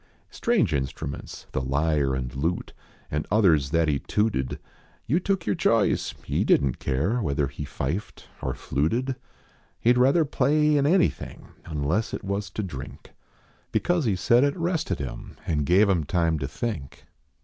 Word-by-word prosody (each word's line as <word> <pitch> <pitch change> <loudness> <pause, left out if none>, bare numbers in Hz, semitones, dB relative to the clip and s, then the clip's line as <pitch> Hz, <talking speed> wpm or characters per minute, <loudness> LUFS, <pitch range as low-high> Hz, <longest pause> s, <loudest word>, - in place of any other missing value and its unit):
Strange 225 - +1
instruments 70 0 -4
the 65 - -1
lyre 70 0 +1
and 65 -1 -4
lute 80 +6 -2 0.4
And 75 +1 -2
others 85 -10 +4
that 80 +1 +2
he 70 -2 +1
tooted. 105 - -1 0.5
You 155 +9 +2
took 195 -1 -1
your 105 - +1
choice. - - +1
He - - 0
didn 70 -3 +3
t - - -16
care 80 - 0
Whether 70 -5 0
he 75 +2 -6
fifed 80 +10 -4 0.2
or - - -3
Muted. 115 - +1 0.6
He 120 - +4
d 125 - +1
rather 140 +6 +4
play 150 +1 +2
an 140 - +2
anvthing. 175 +4 0 0.2
Unless 80 +7 -1
it - - -7
was 100 +1 -2
to 105 - -4
drink, 70 -9 -8 0.6
Because 175 -4 +1
he 105 -4 +2
said 120 +8 +4
it 145 +4 +1
rested 165 - -1
ini 70 -3 -7
An 75 -3 0
gave 95 +7 +5
im 90 -5 +2
time 80 0 +1
to 65 - -2
think. 80 - -5
90 Hz, 160 wpm, -26 LUFS, -, 0.6 s, gave